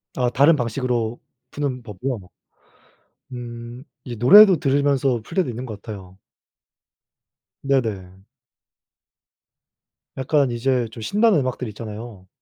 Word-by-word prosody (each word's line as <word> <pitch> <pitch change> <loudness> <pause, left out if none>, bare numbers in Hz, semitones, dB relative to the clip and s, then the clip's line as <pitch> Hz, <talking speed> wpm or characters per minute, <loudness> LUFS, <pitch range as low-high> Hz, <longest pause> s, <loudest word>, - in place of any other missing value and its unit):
아, 125 -2 +1
다른 140 +6 +4
방식으로 120 -2 -2 0.3
푸는 140 -4 -3
법이요? 115 +3 -5 1.1
음. 120 0 -8 0.2
이 120 -2 -7
노래도 190 - +8
들으면서 135 -3 +1
풀 - - -11
때도 185 -8 +1
있는 120 +2 -5
것 110 -4 -8
같아요. 95 -3 -10 1.4
네네. 100 -9 -2 1.9
약간 135 -1 +1
이제 120 0 0
좀 115 0 -10
신나는 205 - +2
음악들 130 -2 -3
있잖아요. 105 -2 -9
125 Hz, 225 characters per minute, -22 LUFS, 110-135 Hz, 1.9 s, 노래도